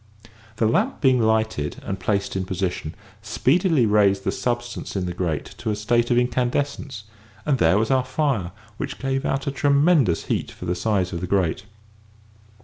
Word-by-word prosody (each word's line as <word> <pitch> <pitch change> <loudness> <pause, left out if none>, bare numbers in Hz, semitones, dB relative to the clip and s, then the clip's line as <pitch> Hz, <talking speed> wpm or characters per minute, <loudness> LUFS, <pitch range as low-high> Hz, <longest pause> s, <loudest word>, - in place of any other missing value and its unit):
The 110 - +1
lamp 110 - +1
being 130 -3 +4
lighted 110 -9 0
and 95 0 -4
placed 100 +1 -1
in 95 - -1
position, 90 -4 -3 0.3
speedily 160 - +2
raised 100 -2 +3
the - - 0
substance 120 -2 -3
in 95 -2 -1
the 90 - -3
grate 85 -4 -3
to - - -3
a 105 - 0
state 120 +3 +1
of 120 - +3
incandescence, 125 0 -1 0.4
and 140 -4 +1
there 85 +1 +4
was 110 +4 +1
our 130 -1 +3
fire, 130 - -1 0.3
which - - -4
gave 135 0 -1
out 135 0 -1
a 140 - -1
tremendous 140 - +3
heat - - -1
for - - -9
the 90 - 0
size 95 -1 0
of 85 - -4
the 90 - -3
grate. 95 0 0
110 Hz, 175 wpm, -23 LUFS, 95-130 Hz, 0.4 s, being